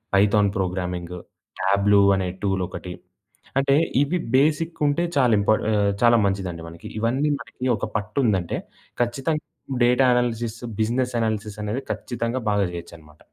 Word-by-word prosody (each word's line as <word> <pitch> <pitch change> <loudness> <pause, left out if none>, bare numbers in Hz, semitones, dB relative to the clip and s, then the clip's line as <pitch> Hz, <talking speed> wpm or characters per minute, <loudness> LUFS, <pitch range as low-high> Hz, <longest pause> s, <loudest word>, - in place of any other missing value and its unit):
Python 100 +1 +4
programming, 90 -2 -3 0.5
Tableau 100 +1 +4
అనే 95 -1 -1
టూలొకటి. 95 -2 -2 0.6
అంటే, 135 0 +3 0.3
ఇవి 150 +5 +1 0.2
బేసిక్ 160 +4 +1
ఉంటే 145 +4 +1
చాలా 125 -3 +4
ఇంపా 100 +2 +3 0.2
ఆహ్, 100 -1 +2
చాలా 120 0 +6
మంచిదండి 95 -4 -2
మనకి. 85 0 -11
ఇవన్నీ 130 +7 +1
మనకి 130 - -8
ఒక - - -3
పట్టుందంటే 105 -4 0 0.4
ఖచ్చితంగా 135 +6 -1 0.4
డేటా 125 +2 +4
అనాలిసిస్, 120 -2 -1 0.2
బిజినెస్ 125 +3 0
అనాలిసిస్ 110 -2 -2
అనేది 110 +6 -2
ఖచ్చితంగా 120 0 -3
బాగా 100 -1 +2
చేయొచ్చన్నమాట. 80 -3 -10
110 Hz, 125 wpm, -23 LUFS, 95-125 Hz, 0.6 s, చాలా